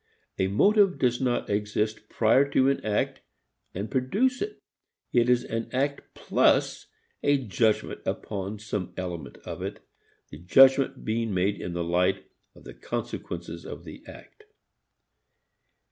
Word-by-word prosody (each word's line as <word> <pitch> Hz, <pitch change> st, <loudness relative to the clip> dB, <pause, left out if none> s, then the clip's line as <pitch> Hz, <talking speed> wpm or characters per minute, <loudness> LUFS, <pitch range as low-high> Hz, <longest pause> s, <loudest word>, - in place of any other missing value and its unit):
A 95 Hz, -, +2 dB
motive 195 Hz, -, +4 dB
does 125 Hz, -1 st, +1 dB
not 125 Hz, -2 st, 0 dB
exist 105 Hz, +1 st, -2 dB
prior 130 Hz, +5 st, +3 dB
to 135 Hz, -1 st, +3 dB
an 140 Hz, -, -3 dB
act 105 Hz, -1 st, -1 dB, 0.5 s
and 100 Hz, +4 st, -4 dB
produce 205 Hz, -, +1 dB
it. 415 Hz, 0 st, -4 dB, 0.6 s
It 120 Hz, 0 st, +3 dB
is 125 Hz, -1 st, +3 dB
an 115 Hz, 0 st, -4 dB
act 140 Hz, +2 st, -2 dB
plus -, -, +2 dB, 0.3 s
a 145 Hz, 0 st, +3 dB
judgment 110 Hz, -3 st, 0 dB
upon 100 Hz, 0 st, -4 dB
some 105 Hz, -3 st, -5 dB
element 85 Hz, -6 st, -5 dB
of -, -, -6 dB
it, -, -, -5 dB, 0.5 s
the -, -, -9 dB
judgment 135 Hz, +8 st, +5 dB
being 110 Hz, -2 st, -1 dB
made 95 Hz, +3 st, 0 dB
in 85 Hz, -, -4 dB
the 85 Hz, 0 st, -2 dB
light 90 Hz, +3 st, +1 dB, 0.3 s
of -, -, -16 dB
the -, -, -10 dB
consequences 85 Hz, -1 st, -5 dB
of -, -, -8 dB
the -, -, -11 dB
act. -, -, -14 dB
110 Hz, 140 wpm, -27 LUFS, 95-130 Hz, 0.6 s, judgment